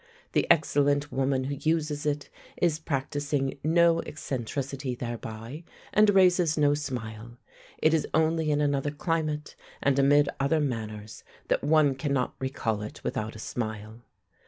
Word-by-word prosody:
The -, -, +1 dB
excellent 145 Hz, -2 st, +3 dB
woman 135 Hz, 0 st, 0 dB
who 140 Hz, +2 st, -3 dB
uses 155 Hz, -1 st, 0 dB
it 145 Hz, -1 st, -2 dB, 0.3 s
is 165 Hz, -3 st, +2 dB
practising 145 Hz, -2 st, -2 dB
no 165 Hz, +1 st, +4 dB
eccentricity 135 Hz, -1 st, -4 dB
thereby, 120 Hz, +4 st, -6 dB, 0.3 s
and 210 Hz, 0 st, +5 dB
raises 180 Hz, -5 st, +4 dB
no 145 Hz, -1 st, +4 dB
smile. 120 Hz, -5 st, -5 dB, 0.4 s
It 155 Hz, -, +3 dB
is 160 Hz, -, +1 dB
only 160 Hz, 0 st, +2 dB
in 150 Hz, 0 st, +2 dB
another 145 Hz, -1 st, +1 dB
climate, 155 Hz, 0 st, -2 dB, 0.2 s
and 140 Hz, -1 st, +2 dB
amid 145 Hz, +1 st, +5 dB
other 140 Hz, +4 st, +2 dB
manners, 110 Hz, -6 st, -4 dB, 0.3 s
that -, -, +1 dB
one 150 Hz, -1 st, +4 dB
cannot 135 Hz, -1 st, -1 dB
recall 115 Hz, -5 st, -2 dB
it 105 Hz, -, -8 dB
without 110 Hz, +1 st, -3 dB
a 110 Hz, -, -7 dB
smile. 110 Hz, -1 st, -5 dB
145 Hz, 135 wpm, -27 LUFS, 125-155 Hz, 0.4 s, and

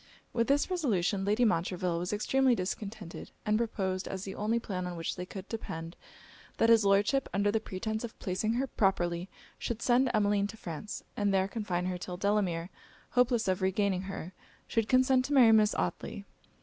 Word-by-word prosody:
With 230 Hz, -1 st, +1 dB
this 280 Hz, +1 st, +3 dB
resolution, 200 Hz, -, 0 dB
Lady 215 Hz, +4 st, +3 dB
Montreville 180 Hz, -3 st, 0 dB
was 180 Hz, +1 st, -3 dB
extremely 255 Hz, +4 st, +2 dB
discontented; 195 Hz, -1 st, -5 dB, 0.2 s
and 210 Hz, 0 st, +2 dB
proposed, 195 Hz, -5 st, -1 dB
as 190 Hz, -1 st, -4 dB
the 195 Hz, -, -5 dB
only 215 Hz, +4 st, 0 dB
plan 185 Hz, -5 st, -3 dB
on 175 Hz, -, -5 dB
which 165 Hz, -, -3 dB
they 180 Hz, 0 st, -6 dB
could 190 Hz, 0 st, -8 dB
depend, 165 Hz, -7 st, -6 dB, 0.6 s
that 225 Hz, -, +3 dB
his 225 Hz, -2 st, +6 dB
Lordship, 205 Hz, +7 st, +3 dB
under 205 Hz, +1 st, +2 dB
pretence 220 Hz, +2 st, -4 dB
of 235 Hz, -, -7 dB
placing 195 Hz, +4 st, -1 dB
her 255 Hz, +3 st, 0 dB
properly, 180 Hz, -6 st, 0 dB, 0.3 s
should 235 Hz, -2 st, -3 dB
send 250 Hz, +1 st, +4 dB
Emmeline 205 Hz, -2 st, +2 dB
to 220 Hz, -, -10 dB
France, 175 Hz, +2 st, -6 dB
and 205 Hz, -1 st, +1 dB
there 190 Hz, -1 st, +2 dB
confine 190 Hz, -4 st, -2 dB
her 180 Hz, -1 st, -2 dB
till 180 Hz, 0 st, -6 dB
Delamere, 190 Hz, -4 st, 0 dB, 0.4 s
hopeless 245 Hz, -2 st, +2 dB
of 185 Hz, -1 st, +1 dB
regaining 190 Hz, 0 st, +1 dB
her, 185 Hz, -2 st, -6 dB, 0.3 s
should 225 Hz, -2 st, 0 dB
consent 255 Hz, 0 st, +4 dB
to 290 Hz, -, -2 dB
marry 245 Hz, -5 st, +7 dB
Miss 215 Hz, -1 st, +4 dB
Otley. 90 Hz, -1 st, -3 dB
205 Hz, 175 wpm, -31 LUFS, 185-225 Hz, 0.6 s, marry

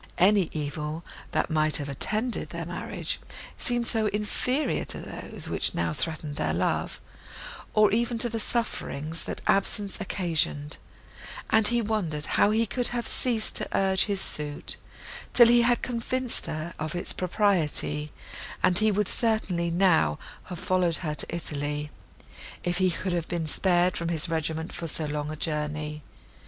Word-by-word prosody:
Any 190 Hz, -1 st, +4 dB
evil, 150 Hz, +1 st, -4 dB, 0.3 s
that -, -, 0 dB
might 155 Hz, -1 st, +4 dB
have 145 Hz, -3 st, -4 dB
attended 215 Hz, -, -1 dB
their -, -, -5 dB
marriage, -, -, -3 dB, 0.4 s
seemed 240 Hz, -2 st, 0 dB
so 225 Hz, -2 st, 0 dB
inferior 230 Hz, +7 st, 0 dB
to -, -, -5 dB
those, -, -, -6 dB
which -, -, 0 dB
now -, -, 0 dB
threatened 150 Hz, +1 st, -3 dB
their -, -, 0 dB
love, -, -, -1 dB, 0.8 s
or 215 Hz, -1 st, +5 dB
even 235 Hz, +2 st, +1 dB
to 235 Hz, -, +3 dB
the 230 Hz, -1 st, -3 dB
sufferings, 165 Hz, -, -2 dB
that -, -, -5 dB
absence 200 Hz, 0 st, +1 dB
occasioned, 160 Hz, -6 st, -1 dB, 0.7 s
that 220 Hz, -1 st, +7 dB
he 240 Hz, 0 st, +2 dB
wondered 175 Hz, -9 st, -1 dB
how -, -, +3 dB
he 225 Hz, +2 st, +2 dB
could 245 Hz, +3 st, -1 dB
have 240 Hz, -1 st, -2 dB
ceased 235 Hz, -4 st, +1 dB
to -, -, -1 dB
urge 190 Hz, -1 st, +3 dB
his 200 Hz, -2 st, -1 dB
suit, 150 Hz, -1 st, -3 dB, 0.6 s
till 240 Hz, -, +9 dB
he 240 Hz, 0 st, +6 dB
had 240 Hz, 0 st, +2 dB
convinced 250 Hz, +1 st, -1 dB
her 155 Hz, +2 st, -4 dB
of 155 Hz, +2 st, -3 dB
its 175 Hz, -, -3 dB
propriety; 165 Hz, -6 st, +2 dB, 0.5 s
and 180 Hz, 0 st, +5 dB
he 215 Hz, 0 st, +4 dB
would 205 Hz, 0 st, +1 dB
certainly 190 Hz, -8 st, +1 dB
now 170 Hz, -, +3 dB, 0.3 s
have 180 Hz, -, -7 dB
followed 180 Hz, -1 st, +1 dB
her 150 Hz, -, -1 dB
to -, -, -3 dB
Italy, 150 Hz, -2 st, -2 dB, 0.7 s
if 175 Hz, +1 st, 0 dB
he 185 Hz, -1 st, +4 dB
could 180 Hz, +1 st, -2 dB
have 170 Hz, -2 st, -1 dB
been 170 Hz, -2 st, -2 dB
spared 180 Hz, +2 st, +2 dB
from 170 Hz, -, -2 dB
his 160 Hz, -3 st, +2 dB
regiment 160 Hz, 0 st, -2 dB
for 165 Hz, -, -4 dB
so 160 Hz, 0 st, +2 dB
long 150 Hz, 0 st, -3 dB
a 155 Hz, -, -4 dB
journey. 150 Hz, -1 st, -3 dB
175 Hz, 160 wpm, -27 LUFS, 155-215 Hz, 0.8 s, till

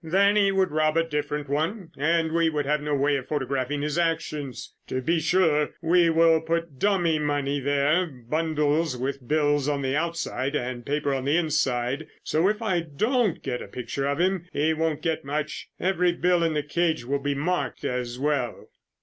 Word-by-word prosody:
"Then 195 Hz, +5 st, +3 dB
he 200 Hz, -2 st, +4 dB
would 190 Hz, -3 st, +1 dB
rob 155 Hz, +1 st, +2 dB
a 165 Hz, -, +4 dB
different 150 Hz, -1 st, -2 dB
one 160 Hz, +6 st, -2 dB
and 160 Hz, +3 st, +1 dB
we 165 Hz, 0 st, +3 dB
would 150 Hz, -2 st, -1 dB
have 150 Hz, +1 st, +1 dB
no 150 Hz, 0 st, -1 dB
way 140 Hz, +1 st, +2 dB
of 130 Hz, -, -7 dB
photographing 140 Hz, 0 st, -2 dB
his 150 Hz, +2 st, -1 dB
actions. 155 Hz, -6 st, -2 dB
To 130 Hz, -, -2 dB
be 165 Hz, +6 st, +1 dB
sure, 160 Hz, -2 st, +2 dB
we 170 Hz, +1 st, +4 dB
will 165 Hz, 0 st, +4 dB
put 165 Hz, -3 st, -2 dB
dummy 175 Hz, -6 st, +2 dB
money 145 Hz, -1 st, 0 dB
there, 145 Hz, +6 st, +2 dB
bundles 150 Hz, +2 st, -1 dB
with 130 Hz, 0 st, -4 dB
bills 145 Hz, -1 st, +2 dB
on 140 Hz, -1 st, -1 dB
the 130 Hz, +1 st, 0 dB
outside 160 Hz, -4 st, -2 dB
and 125 Hz, -3 st, -3 dB
paper 145 Hz, +1 st, -1 dB
on 135 Hz, -1 st, -2 dB
the 145 Hz, +4 st, +3 dB
inside, 140 Hz, -3 st, 0 dB, 0.2 s
so 160 Hz, +4 st, +2 dB
if 215 Hz, +2 st, -2 dB
I 185 Hz, -5 st, +1 dB
don't 205 Hz, -, 0 dB
get 125 Hz, -2 st, -3 dB
a -, -, -7 dB
picture 135 Hz, +2 st, -4 dB
of 140 Hz, +2 st, -1 dB
him, 180 Hz, -1 st, +1 dB
he 155 Hz, +2 st, +1 dB
won't 160 Hz, -1 st, -1 dB
get 165 Hz, -2 st, -1 dB
much. 150 Hz, +2 st, -4 dB
Every 180 Hz, -1 st, +2 dB
bill 175 Hz, 0 st, +2 dB
in 165 Hz, -2 st, +1 dB
the 150 Hz, -, 0 dB
cage 160 Hz, -2 st, 0 dB
will 140 Hz, +3 st, 0 dB
be 145 Hz, 0 st, -1 dB
marked 175 Hz, +6 st, -2 dB
as 125 Hz, -1 st, -2 dB
well." 140 Hz, -4 st, -2 dB
150 Hz, 190 wpm, -25 LUFS, 140-165 Hz, 0.2 s, he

